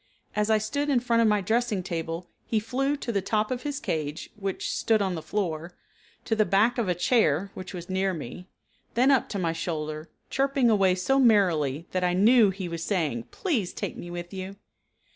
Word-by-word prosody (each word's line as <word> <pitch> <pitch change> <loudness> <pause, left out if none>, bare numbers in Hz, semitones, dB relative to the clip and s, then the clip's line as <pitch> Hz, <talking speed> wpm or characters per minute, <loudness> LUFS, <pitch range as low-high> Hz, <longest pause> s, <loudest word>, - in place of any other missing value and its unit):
As 210 0 +1
I 220 - +5
stood 285 +7 -2
in 265 -4 +4
front 235 -1 +2
of 230 - +4
my 210 -1 +3
dressing 220 -1 0
table 165 0 -4 0.2
he 220 - +1
flew 270 +6 -1
to 245 - -4
the 200 -3 0
top 210 +4 0
of 250 -1 -2
his 290 -1 -3
cage 155 - -3
(which 195 -2 -3
stood 225 -1 +2
on 195 -2 0
the 165 - -4
floor) 170 -1 -3 0.5
to 225 - +1
the 215 - +4
back 210 +6 +2
of 225 - 0
a 180 - +1
chair 195 - +2
(which 185 0 -8
was 175 -1 -7
near 190 +1 0
me), 175 +2 -7 0.5
then 255 +4 +5
up 270 - +2
to 200 - -3
my 170 -3 0
shoulder, 155 -1 -4 0.2
chirping 270 -3 +2
away 195 -3 +4
so 270 +9 +1
merrily 170 - +3
that 185 0 -1
I 180 0 +2
knew 220 +2 +6
he 190 -1 -4
was 170 -1 -4
saying: 155 - -1
"Please 255 - -1
take - - -4
me 175 - -8
with 175 +1 -6
you." 190 +1 -6
195 Hz, 205 wpm, -27 LUFS, 175-230 Hz, 0.5 s, knew